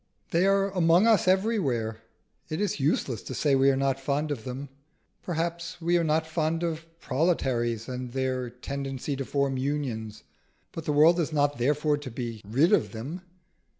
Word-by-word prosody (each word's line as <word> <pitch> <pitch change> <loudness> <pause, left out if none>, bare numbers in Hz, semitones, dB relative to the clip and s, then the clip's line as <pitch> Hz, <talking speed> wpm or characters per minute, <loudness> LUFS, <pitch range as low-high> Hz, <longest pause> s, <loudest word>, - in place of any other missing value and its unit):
They 175 +3 +3
are 195 0 +2
among 175 +1 +4
us 220 -6 +4
everywhere: 150 - +1 0.5
it 155 - -3
is 205 -6 -1
useless 135 -4 0
to 130 - -7
say 145 +2 +2
we 135 0 +5
are 135 - +3
not 135 -1 +1
fond 145 +3 -1
of 120 -7 -4
them. 130 +2 -6 0.5
Perhaps 170 0 -3
we 170 +1 +1
are 170 - +3
not 160 0 +1
fond 160 +1 -1
of 165 -1 -3
proletaries 125 -8 0
and 125 -1 -5
their 130 -1 -1
tendency 135 +2 -4
to 135 0 -4
form 140 -1 0
Unions, 130 -6 -3 0.5
but 165 - -7
the - - 0
world 160 +4 +5
is 160 -2 0
not 145 -4 +1
therefore 150 +4 +2
to 145 - -7
be 115 -2 -5
rid 135 - +2
of - - +2
them. 140 +11 -6
145 Hz, 175 wpm, -27 LUFS, 130-165 Hz, 0.5 s, we